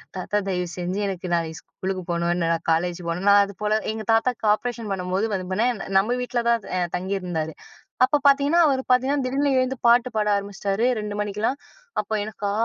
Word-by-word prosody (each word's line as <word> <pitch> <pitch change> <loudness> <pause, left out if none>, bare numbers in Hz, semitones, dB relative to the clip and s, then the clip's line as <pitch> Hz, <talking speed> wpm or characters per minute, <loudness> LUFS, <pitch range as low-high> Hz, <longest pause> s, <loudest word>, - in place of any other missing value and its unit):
தாத்தா 190 +3 -2
தயவு 180 -1 -1
செஞ்சு 180 +3 -2
எனக்கு 185 -1 -4
நாளைக்கு 165 -1 -1
ஸ்கூலுக்கு 185 -1 -5
போணும். 170 0 0
என்ன 165 -2 0
நான் 165 - -4
காலேஜ் 175 +2 0
போணும். 170 +3 -2
நான் 200 0 +7
அது 200 - -9
போல 210 0 +1 0.2
எங்க 220 0 -5
தாத்தாக்கு 225 0 +1
ஆப்ரேஷன் 230 -1 -4
பண்ணும்போது, 185 +2 -1
வந்து 185 -2 -3
பண்ணேன் 225 +2 0 0.2
நம்ம 235 +5 0
வீட்ல 245 -1 -1
தான் 230 -3 +2
எ - - +1 0.2
தங்கியிருந்தாரு. 180 -4 -3 0.5
அப்ப 290 +3 +1
பார்த்தீங்கன்னா, 285 +5 +4
அவர் 265 -2 +1
பார்த்தீங்கன்னா 265 +2 +2
திடீர்னு 275 +2 +1
எழுந்து 255 0 0
பாட்டு 240 +1 +5
பாட 210 -1 +1
ஆரம்பிச்சிட்டாரு, 200 +2 -2
2 210 -1 -4
மணிக்கெல்லாம்! 210 +6 -2 0.4
அப்போ, 210 +1 -6
எனக்கா? 210 -1 -4
205 Hz, 180 wpm, -24 LUFS, 180-240 Hz, 0.5 s, நான்